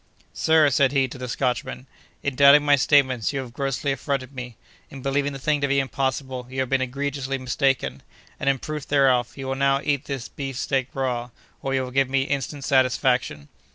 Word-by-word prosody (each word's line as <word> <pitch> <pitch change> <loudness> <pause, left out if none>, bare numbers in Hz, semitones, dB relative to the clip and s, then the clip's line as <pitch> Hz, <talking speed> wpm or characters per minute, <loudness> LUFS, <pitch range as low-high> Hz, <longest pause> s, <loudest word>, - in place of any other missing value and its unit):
"'Sir,' 160 -2 +4
said 135 -1 +3
he 135 -2 +2
to 130 - -10
the 125 - -5
Scotchman, 125 0 -2 0.4
'in 140 -2 -1
doubting 140 +2 +7
my 145 -1 +6
statements, 130 -4 +2
you 140 - -3
have 125 -3 -7
grossly 135 +1 -1
affronted 135 -1 -3
me; 125 -3 -8 0.3
in 135 -2 -10
believing 140 +1 0
the 135 - -6
thing 145 +2 0
to 140 - +2
be 140 0 +2
impossible, 130 -1 -2
you 130 +1 -5
have 130 -1 -1
been 135 -1 +2
egregiously 135 +1 -3
mistaken; 130 - -1 0.4
and, 140 - +1
in 135 - +2
proof 150 +2 -6
thereof, 130 -4 +3
you 135 - -6
will 135 - -2
now 135 0 +2
eat 140 -1 0
this 135 -4 -5
beef 135 -3 -6
steak 135 -1 0
raw, 125 -2 -2 0.3
or 135 0 -1
you 130 - +1
will 125 - -6
give 135 0 +2
me 135 0 +2
instant 140 +1 -3
satisfaction! 125 - +1
135 Hz, 200 wpm, -24 LUFS, 130-140 Hz, 0.4 s, doubting